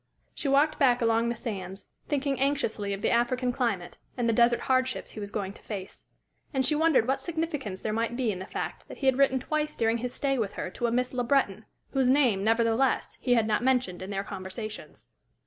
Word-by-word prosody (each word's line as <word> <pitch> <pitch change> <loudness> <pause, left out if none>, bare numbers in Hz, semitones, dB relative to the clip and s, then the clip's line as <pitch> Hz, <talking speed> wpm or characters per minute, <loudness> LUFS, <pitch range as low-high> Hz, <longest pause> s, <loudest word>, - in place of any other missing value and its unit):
She - - -3
walked 290 +3 +3
back 250 -3 +4
along 230 0 +2
the 235 - -1
sands, 195 -5 -6 0.2
thinking 280 -2 0
anxiously 270 -7 0
of 200 0 -4
the - - +2
African 245 +1 +1
climate 225 -8 -2 0.2
and 240 -2 0
the 230 - +3
desert 235 +1 +4
hard 260 0 +2
ships 260 - -5
he - - -8
was 205 -1 -5
going 200 -2 -3
to - - -15
face. 195 -3 -7 0.5
And 265 -1 +2
she 305 - +3
wondered 305 -6 +3
what 270 - 0
significance 310 - -3
there 215 - -2
might 230 +2 -1
be 245 -4 +1
in 185 - -5
the 190 - -7
fact - - -5
that - - -10
he 275 - -4
had 265 0 +3
written 265 -1 +4
twice 305 +3 -2
during 225 +1 +1
his 250 +1 -3
stay 270 0 0
with 205 -3 -1
her 180 - -4
to 240 - -1
a - - -1
Miss 250 +2 0
Le 250 -1 0
Breton, 235 -5 +1 0.3
whose 265 -2 +2
name, 250 -8 +3
nevertheless, 230 +3 +2
he 245 -1 +3
had 225 -2 +3
not 215 +1 +1
mentioned 250 -9 +1
in 185 - -6
their 195 -1 -2
conversations. 195 +3 -7
240 Hz, 225 wpm, -28 LUFS, 210-265 Hz, 0.5 s, back